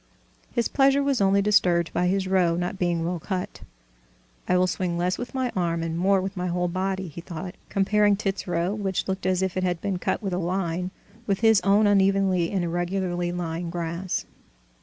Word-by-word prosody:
His 235 -2 0
pleasure 275 0 +3
was 275 -5 +1
only 195 0 +3
disturbed 175 -5 +3
by 180 - +1
his 190 +1 0
row 180 -3 +3
not 180 +2 -3
being 170 -2 0
well 175 0 -2
cut. 185 +2 -4 0.9
"I 180 - +3
will 180 - +4
swing 180 -1 -2
less 180 +2 0
with 245 +2 -6
my 260 -2 0
arm 170 -2 0
and 165 0 -3
more 190 +3 +3
with 190 +1 -4
my 180 -1 -2
whole 180 0 0
body," 190 +1 -2
he 165 +2 -8
thought, 180 +1 -7 0.2
comparing 205 +1 +3
Tit's 195 -1 -3
row, 175 +2 0
which 195 -3 -2
looked 190 -1 -2
as 185 0 +1
if 190 -1 -2
it 185 - -1
had 175 -2 0
been 190 -1 -2
cut - - -1
with 195 -2 -2
a 180 - 0
line, 180 0 -1 0.4
with 195 -1 0
his 220 -3 +5
own 200 +3 +4
unevenly 195 -3 +3
and 190 -3 -1
irregularly 175 0 -1
lying 170 -1 -3
grass. 170 +1 -3
185 Hz, 200 wpm, -25 LUFS, 175-195 Hz, 0.9 s, his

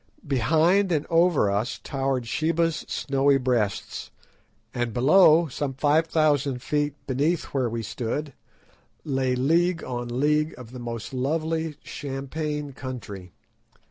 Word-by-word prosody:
Behind 160 +9 +3
and 155 -3 +1
over 165 - +4
us 105 +5 -1
towered 135 -2 -1
Sheba's 165 +6 0
snowy 140 0 +2
Breasts, 120 -6 -1 0.6
and 120 -2 -2
below, 160 +5 +6
some 140 -1 -4
five 150 +4 +2
thousand 145 -5 +1
feet 145 -1 0
beneath 145 +6 0
where 130 -4 +1
we 115 0 -3
stood, 125 +6 -4 0.7
lay 130 -3 0
league 165 +6 +2
on 120 -1 -4
league 150 +2 +2
of 120 -2 -11
the 125 - -8
most 115 0 -6
lovely 160 +4 -1
champaign 145 +1 -4
country. 115 -9 -7
140 Hz, 120 wpm, -25 LUFS, 125-155 Hz, 0.7 s, below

